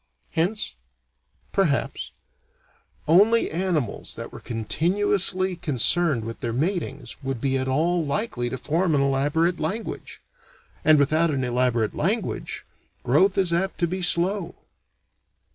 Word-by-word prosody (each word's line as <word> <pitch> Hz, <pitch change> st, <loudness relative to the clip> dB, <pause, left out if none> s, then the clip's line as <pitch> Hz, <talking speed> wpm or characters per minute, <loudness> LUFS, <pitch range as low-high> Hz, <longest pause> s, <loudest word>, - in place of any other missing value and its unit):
Hence 185 Hz, +7 st, -1 dB, 0.8 s
perhaps 175 Hz, -8 st, 0 dB, 1.0 s
only 210 Hz, +8 st, +4 dB
animals 165 Hz, -, -2 dB
that -, -, -8 dB
were -, -, -9 dB
continuously 185 Hz, -, +1 dB
concerned 155 Hz, -4 st, +2 dB
with 115 Hz, 0 st, -6 dB
their 120 Hz, -, -3 dB
matings 150 Hz, -, -3 dB
would 135 Hz, -3 st, -4 dB
be 135 Hz, +2 st, 0 dB
at 130 Hz, 0 st, -1 dB
all 165 Hz, +6 st, +1 dB
likely 140 Hz, -, -2 dB
to 130 Hz, -, -4 dB
form 165 Hz, +4 st, 0 dB
an 140 Hz, -, +2 dB
elaborate 145 Hz, +6 st, +1 dB
language. 200 Hz, +9 st, -5 dB, 0.6 s
And 155 Hz, -1 st, +6 dB
without 155 Hz, +4 st, +2 dB
an 135 Hz, -3 st, -1 dB
elaborate 120 Hz, -3 st, 0 dB
language, -, -, -2 dB, 0.4 s
growth 185 Hz, +10 st, +3 dB
is 185 Hz, -3 st, +2 dB
apt 190 Hz, +3 st, -1 dB
to -, -, +4 dB
be 185 Hz, +2 st, -4 dB
slow. 180 Hz, +1 st, +3 dB
160 Hz, 125 wpm, -24 LUFS, 135-185 Hz, 1.0 s, And